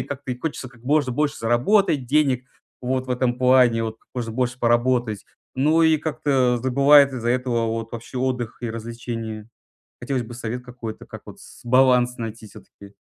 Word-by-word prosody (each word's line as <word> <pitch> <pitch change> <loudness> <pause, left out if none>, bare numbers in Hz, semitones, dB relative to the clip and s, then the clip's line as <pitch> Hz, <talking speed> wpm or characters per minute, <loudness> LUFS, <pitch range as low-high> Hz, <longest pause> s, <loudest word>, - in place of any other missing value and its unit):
и - - -1
как-то 135 -2 -6
и 125 - -8
хочется 135 -3 -4
как 120 -2 -20
можно 140 -1 +1
больше 150 +2 0
заработать 130 - +2
денег 135 -2 +1 0.4
вот 130 +1 -1
в - - -8
этом 125 0 0
плане, 125 -3 +4
вот 110 0 -5
как - - -35
можно 115 -3 -4
больше 125 +1 -2
поработать, 120 -2 +1 0.3
ну, 155 +5 +3
и 160 -1 +4
как-то 135 -5 0
забывает 140 +2 +5
из-за 120 -2 -3
этого 120 -2 0
вот 115 0 -4
вообще 120 +2 -7
отдых 125 -3 -2
и 120 - -3
развлечения. 115 -1 -6 0.5
Хотелось 130 0 -1
бы 120 +1 -10
совет 120 +1 -5
какой-то, 120 -3 -8
как - - -10
вот - - -12
с - - -15
баланс 125 0 +3
найти 115 -1 -7
всё-таки. 100 0 -15
125 Hz, 180 wpm, -22 LUFS, 115-130 Hz, 0.5 s, забывает